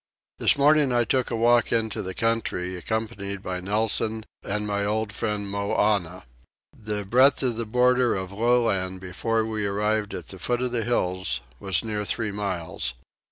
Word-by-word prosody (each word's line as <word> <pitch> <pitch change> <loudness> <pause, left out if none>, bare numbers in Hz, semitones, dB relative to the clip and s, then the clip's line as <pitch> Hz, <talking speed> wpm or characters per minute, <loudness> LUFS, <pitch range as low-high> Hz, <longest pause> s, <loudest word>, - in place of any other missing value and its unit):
This - - +4
morning 145 -1 +4
I 120 -1 +3
took 130 +1 0
a - - -2
walk 120 0 +3
into 110 -1 0
the 95 -2 -6
country 115 -5 -1
accompanied 100 0 -4
by 90 0 -3
Nelson 110 +2 0 0.2
and 105 +1 -2
my 100 -1 -1
old 105 +1 -1
friend 105 -3 -2
Moannah. 100 -2 0 0.5
The 105 -2 -3
breadth 130 +7 +4
of 125 -3 +1
the 115 0 -3
border 125 +1 +3
of 95 -1 -4
low 120 +4 +2
land 95 -4 -1
before 110 +5 -1
we 110 -2 -2
arrived 105 +1 0
at - - -8
the 95 - -9
foot 120 +7 0
of 125 - -1
the 120 -2 -1
hills 95 - 0 0.2
was 95 -3 +1
near 105 -2 -2
three 105 +1 -1
miles. 90 -10 -3
105 Hz, 170 wpm, -25 LUFS, 100-115 Hz, 0.5 s, This